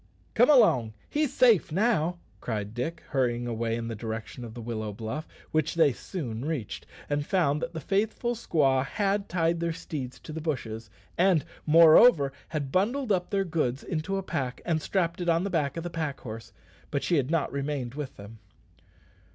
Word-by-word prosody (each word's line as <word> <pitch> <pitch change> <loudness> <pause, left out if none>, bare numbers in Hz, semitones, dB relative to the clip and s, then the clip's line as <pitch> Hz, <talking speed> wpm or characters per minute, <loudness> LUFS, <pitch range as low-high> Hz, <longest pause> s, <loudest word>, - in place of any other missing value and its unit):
"Come 245 +4 +5
along; 130 - +5 0.2
he's 300 -3 +1
safe 235 - +4
now," 180 -3 +1 0.2
cried 105 -2 -4
Dick, 155 +8 -4
hurrying 120 -3 0
away 115 -1 -1
in 115 0 -4
the 115 - -3
direction 110 +2 -6
of 115 -1 -8
the 120 - -6
willow 110 -2 -3
bluff, 110 +9 -5 0.2
which 155 0 0
they 160 -5 +4
soon 120 - -5
reached, 145 -8 -4 0.2
and 145 0 0
found 150 -3 +1
that 165 +1 -4
the 160 - -4
faithful 215 - 0
squaw 140 - +2
had 200 +6 -1
tied 170 -1 +1
their 170 -1 -1
steeds 145 -6 -6
to 155 - -8
the 160 - -4
bushes, 120 -8 -4 0.3
and, 180 -4 +4 0.2
moreover, 160 - +7
had 145 -4 -3
bundled 225 - +1
up 180 -2 +1
their 195 -1 +1
goods 150 -7 -1
into 175 +3 -2
a 195 - -3
pack, 135 -9 -3
and 160 -2 0
strapped 175 -1 -1
it 175 - 0
on 165 +1 +3
the 200 - -2
back 150 -3 0
of 165 - -3
the 175 - -4
pack 155 -4 -3
horse; 115 -1 -8 0.4
but 140 - -2
she 175 - +2
had 135 -1 0
not 165 -2 0
remained 140 -3 -3
with 145 -2 -6
them. 100 +2 -11
155 Hz, 185 wpm, -28 LUFS, 125-175 Hz, 0.4 s, moreover